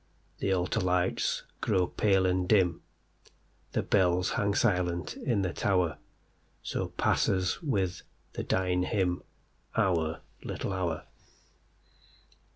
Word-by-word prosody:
The 95 Hz, -, 0 dB
altar 90 Hz, +3 st, +1 dB
lights 90 Hz, -1 st, +1 dB, 0.2 s
grow 90 Hz, -1 st, +2 dB
pale 95 Hz, 0 st, +2 dB
and 90 Hz, 0 st, +1 dB
dim, 90 Hz, -5 st, +3 dB, 0.9 s
The -, -, +1 dB
bells 90 Hz, -2 st, +2 dB
hang 100 Hz, -1 st, +1 dB
silent 90 Hz, -6 st, +1 dB
in 110 Hz, -6 st, 0 dB
the 90 Hz, -, -1 dB
tower—So 90 Hz, -6 st, -3 dB
passes 95 Hz, -1 st, +1 dB
with 95 Hz, -, -1 dB, 0.3 s
the -, -, -3 dB
dying 90 Hz, -1 st, +1 dB
hymnOur 90 Hz, -3 st, -1 dB, 0.2 s
little 95 Hz, -, -3 dB
hour. 90 Hz, -4 st, -2 dB
90 Hz, 100 wpm, -30 LUFS, 90-95 Hz, 0.9 s, dim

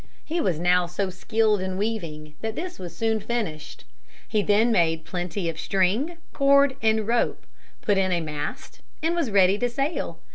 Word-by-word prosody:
He 335 Hz, +2 st, -1 dB
was 180 Hz, -5 st, +1 dB
now 180 Hz, +1 st, +3 dB
so 185 Hz, +2 st, -2 dB
skilled 215 Hz, +2 st, +1 dB
in 185 Hz, 0 st, -3 dB
weaving 165 Hz, -8 st, -3 dB
that 220 Hz, 0 st, -3 dB
this 360 Hz, +2 st, -5 dB
was 175 Hz, -2 st, -7 dB
soon 225 Hz, -1 st, +1 dB
finished. 200 Hz, -10 st, -4 dB, 0.4 s
He 215 Hz, -, +1 dB
then 215 Hz, +3 st, +3 dB
made 165 Hz, -5 st, +2 dB
plenty 180 Hz, +1 st, -3 dB
of 165 Hz, -1 st, -3 dB
string, 210 Hz, -, +1 dB, 0.2 s
cord, 280 Hz, -1 st, +4 dB
and 220 Hz, -1 st, +2 dB
rope, 235 Hz, 0 st, 0 dB, 0.4 s
put 205 Hz, -2 st, +2 dB
in 190 Hz, -1 st, +1 dB
a 175 Hz, -, +2 dB
mast 150 Hz, -2 st, -6 dB, 0.2 s
and 330 Hz, +1 st, +2 dB
was 335 Hz, -8 st, 0 dB
ready 195 Hz, 0 st, +4 dB
to 245 Hz, -, +1 dB
sail. 275 Hz, -, -2 dB
205 Hz, 175 wpm, -25 LUFS, 175-235 Hz, 0.4 s, cord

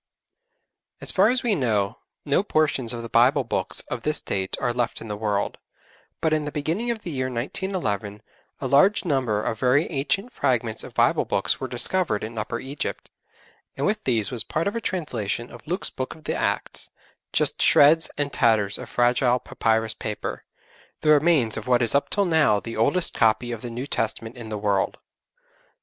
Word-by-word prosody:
As -, -, -2 dB
far 195 Hz, +2 st, +4 dB
as 250 Hz, 0 st, +1 dB
we 235 Hz, -3 st, +2 dB
know 110 Hz, -, 0 dB, 0.3 s
no 145 Hz, +4 st, +3 dB
portions 155 Hz, -, +1 dB
of 120 Hz, -1 st, -4 dB
the -, -, -5 dB
Bible 125 Hz, +5 st, +4 dB
books 120 Hz, -, -2 dB
of -, -, -6 dB
this -, -, +1 dB
date 95 Hz, -1 st, -2 dB
are 120 Hz, -2 st, 0 dB
left 120 Hz, -1 st, -1 dB
in 115 Hz, -, -9 dB
the 105 Hz, -, -2 dB
world, 105 Hz, -1 st, -2 dB, 0.6 s
but 160 Hz, -1 st, +2 dB
in 155 Hz, -1 st, 0 dB
the 145 Hz, -, -4 dB
beginning 165 Hz, +12 st, -2 dB
of 230 Hz, -2 st, -3 dB
the 175 Hz, -, -5 dB
year 130 Hz, -3 st, -1 dB
1911 115 Hz, -, -3 dB, 0.4 s
a -, -, -5 dB
large 190 Hz, +11 st, +4 dB
number 125 Hz, -9 st, 0 dB
of 110 Hz, -, -2 dB
very 135 Hz, +4 st, +3 dB
ancient 170 Hz, -, -1 dB
fragments 120 Hz, -5 st, 0 dB
of -, -, -11 dB
Bible -, -, +3 dB
books -, -, 0 dB
were 130 Hz, -, -3 dB
discovered 125 Hz, -, +1 dB
in 110 Hz, +1 st, -5 dB
Upper 115 Hz, +2 st, -3 dB
Egypt, 140 Hz, +2 st, -5 dB, 0.7 s
and 140 Hz, -, -1 dB
with 215 Hz, +1 st, 0 dB
these 115 Hz, -3 st, +1 dB
was 120 Hz, -4 st, -1 dB
part 160 Hz, -, -2 dB
of 200 Hz, -, -2 dB
a 230 Hz, -, -2 dB
translation 120 Hz, -, -3 dB
of -, -, -13 dB
Luke's 180 Hz, +4 st, -2 dB
Book 130 Hz, -, -5 dB
of 155 Hz, -, -17 dB
the -, -, -2 dB
Acts -, -, -2 dB, 0.4 s
just -, -, +2 dB
shreds 155 Hz, +3 st, +6 dB
and 145 Hz, -1 st, -1 dB
tatters 110 Hz, -5 st, +2 dB
of -, -, -8 dB
fragile 125 Hz, +1 st, +3 dB
papyrus 110 Hz, -2 st, 0 dB
paper, 105 Hz, -1 st, -5 dB, 0.6 s
the 155 Hz, -, +1 dB
remains 150 Hz, -6 st, +4 dB
of -, -, -6 dB
what 125 Hz, -1 st, +3 dB
is 115 Hz, -, +2 dB
up 140 Hz, -, +1 dB
till 200 Hz, -1 st, +1 dB
now 160 Hz, -, +3 dB
the 115 Hz, +2 st, -7 dB
oldest 145 Hz, +11 st, +1 dB
copy 115 Hz, +2 st, +2 dB
of 115 Hz, -2 st, -5 dB
the 120 Hz, -, -5 dB
New 120 Hz, +3 st, -5 dB
Testament 115 Hz, -3 st, -3 dB
in 120 Hz, -3 st, -9 dB
the 105 Hz, -, -3 dB
world. 100 Hz, -1 st, 0 dB
125 Hz, 190 wpm, -24 LUFS, 110-155 Hz, 0.7 s, shreds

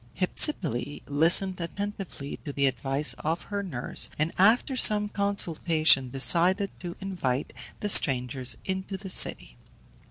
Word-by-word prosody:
Hypsipyle 160 Hz, -, 0 dB
listened 175 Hz, +5 st, +4 dB
attentively 190 Hz, -4 st, -7 dB
to 145 Hz, -, -9 dB
the 140 Hz, 0 st, -1 dB
advice 135 Hz, +2 st, +1 dB
of 165 Hz, +3 st, -3 dB
her 200 Hz, 0 st, -5 dB
nurse, 140 Hz, -11 st, -3 dB
and 155 Hz, +2 st, -2 dB
after 225 Hz, +7 st, +2 dB
some 210 Hz, -4 st, +4 dB
consultation, 165 Hz, -9 st, +2 dB
decided 175 Hz, +9 st, +3 dB
to 175 Hz, -1 st, -8 dB
invite 155 Hz, -9 st, -4 dB, 0.3 s
the 210 Hz, -, -3 dB
strangers 130 Hz, -, +1 dB
into 190 Hz, +1 st, -5 dB
the 190 Hz, 0 st, -9 dB
city. -, -, -1 dB
170 Hz, 125 wpm, -26 LUFS, 140-195 Hz, 0.3 s, listened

